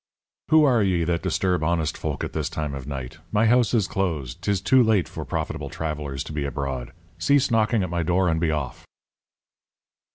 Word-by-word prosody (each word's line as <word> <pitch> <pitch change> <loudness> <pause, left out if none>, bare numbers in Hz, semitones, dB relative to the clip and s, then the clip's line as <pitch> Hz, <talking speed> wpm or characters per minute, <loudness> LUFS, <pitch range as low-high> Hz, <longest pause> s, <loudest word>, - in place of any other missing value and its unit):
"Who 155 0 +6
are 125 -6 +4
ye 90 -4 +2
that 85 0 0
disturb 90 -1 0
honest 80 -1 0
folk - - -3
at - - -4
this - - -2
time 75 -2 -3
of 70 -1 -7
night? 65 +1 -6
My 110 +1 +3
house 120 -1 +4
is 110 -4 +3
closed. 80 -11 -2
'Tis 100 -2 0
too 130 +7 +4
late 110 -6 +3
for - - -6
profitable - - -3
travellers 75 -3 -4
to 75 - -8
be 75 -1 -2
abroad. 70 -3 -4 0.3
Cease 140 -3 +3
knocking 110 -1 +2
at 90 - -4
my 85 0 0
door, 90 +2 +2
and 80 -1 +1
be 80 -1 +1
off." 75 -4 -3
85 Hz, 195 wpm, -24 LUFS, 75-105 Hz, 0.3 s, Who